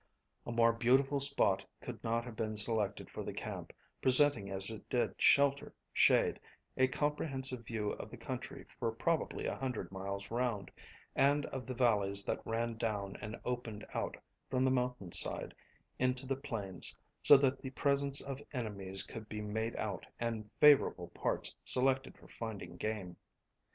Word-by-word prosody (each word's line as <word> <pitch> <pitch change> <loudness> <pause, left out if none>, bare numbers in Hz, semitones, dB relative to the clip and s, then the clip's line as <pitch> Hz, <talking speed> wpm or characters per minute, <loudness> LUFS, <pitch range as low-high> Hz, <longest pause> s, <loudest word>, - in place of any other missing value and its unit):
A - - -3
more 115 0 +4
beautiful 135 +4 +3
spot 135 -9 +3 0.2
could - - -8
not 115 +1 0
have 120 -2 -8
been 110 -1 -3
selected 105 -1 0
for - - -5
the - - -6
camp, - - -5 0.3
presenting 130 -6 +5
as 95 +2 +4
it 110 - -9
did 125 - +1
shelter, 140 0 +4 0.2
shade, - - +4 0.4
a 130 - +4
comprehensive 130 -4 -1
view 105 -3 -2
of - - -7
the - - -10
country - - -6 0.2
for 115 - 0
probably 160 +8 -1
a - - -1
hundred 130 -7 -4
miles 100 +1 -5
round, 115 -5 -1 0.4
and 145 +1 +3
of 130 -3 -6
the 130 - -4
valleys 100 -5 +2
that - - -2
ran 115 0 -1
down 105 -4 -2
and 105 +2 -6
opened 120 -4 -4
out - - -2 0.3
from 130 0 +1
the 130 - +3
mountain 125 -7 -1
side - - +2 0.5
into 130 +1 +1
the 135 +1 -1
plains, 100 -8 -3 0.3
so 145 - +9
that 135 -1 +1
the 130 - -5
presence 140 +1 +3
of 135 0 -6
enemies 100 -6 -2
could 110 -2 -9
be 105 - -5
made 110 +2 -3
out 105 -3 -4
and 115 -2 -3
favourable 150 -2 +5
parts - - -2
selected 135 +1 +2
for - - -17
finding 100 -6 -7
game. 95 -3 -4
115 Hz, 160 wpm, -34 LUFS, 105-130 Hz, 0.5 s, so